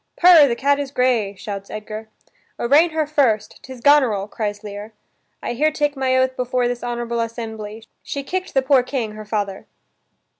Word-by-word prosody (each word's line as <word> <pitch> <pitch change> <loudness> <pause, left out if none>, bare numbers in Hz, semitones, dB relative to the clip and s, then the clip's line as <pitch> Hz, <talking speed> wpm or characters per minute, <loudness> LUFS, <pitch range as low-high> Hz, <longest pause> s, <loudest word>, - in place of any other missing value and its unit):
"Purr, 340 -5 +8
the 235 - 0
cat 280 +3 +2
is 285 -1 -3
gray," 245 -7 +1
shouts 200 0 -7
Edgar. 215 +1 -7 0.5
"Arraign 290 +8 +4
her 315 -1 -1
first, 275 -8 0
'tis 260 -2 -11
Goneril," 250 -9 +4
cries 205 -1 -4
Lear. 210 +1 -8 0.5
"I - - -2
here 300 +6 +2
take 295 -1 -1
my 260 -1 +1
oath 260 0 +1
before 250 -1 0
this 245 0 -3
honorable 240 -1 -3
assembly, 225 -2 -5 0.2
she 280 - -5
kicked 370 +4 -4
the 270 - +3
poor 265 -1 +4
king, 245 -4 -3
her 215 0 -9
father." 205 -2 -3
245 Hz, 175 wpm, -21 LUFS, 215-280 Hz, 0.5 s, Purr